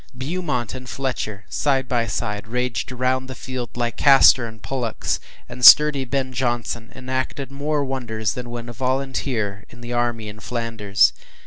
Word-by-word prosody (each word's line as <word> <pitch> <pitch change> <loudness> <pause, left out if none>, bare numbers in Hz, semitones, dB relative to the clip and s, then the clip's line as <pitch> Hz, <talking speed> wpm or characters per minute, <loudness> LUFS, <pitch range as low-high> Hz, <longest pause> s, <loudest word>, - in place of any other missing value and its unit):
Beaumont 135 -4 -3
and 130 -1 -8
Fletcher, 125 -6 -4
side 135 -3 0
by 120 -2 0
side, 105 +1 -3
raged 125 -1 -2
round 130 +1 0
the 130 - -7
field 125 -1 -6
like 120 -1 -2
Castor 135 -3 +6
and 110 0 -11
Pollux, 120 -2 -2 0.3
and 125 +1 -9
sturdy 145 +2 +8
Ben 130 0 -2
Jonson 120 -2 -2
enacted 130 +1 -4
more 145 +1 -1
wonders 115 -5 -2
than 125 -1 -6
when 120 0 -6
a 120 - -7
volunteer 125 -5 -2
with 120 - -15
the 120 0 -6
army 120 -2 -1
in 105 +1 -9
Flanders. 105 - +1
125 Hz, 155 wpm, -22 LUFS, 115-130 Hz, 0.3 s, sturdy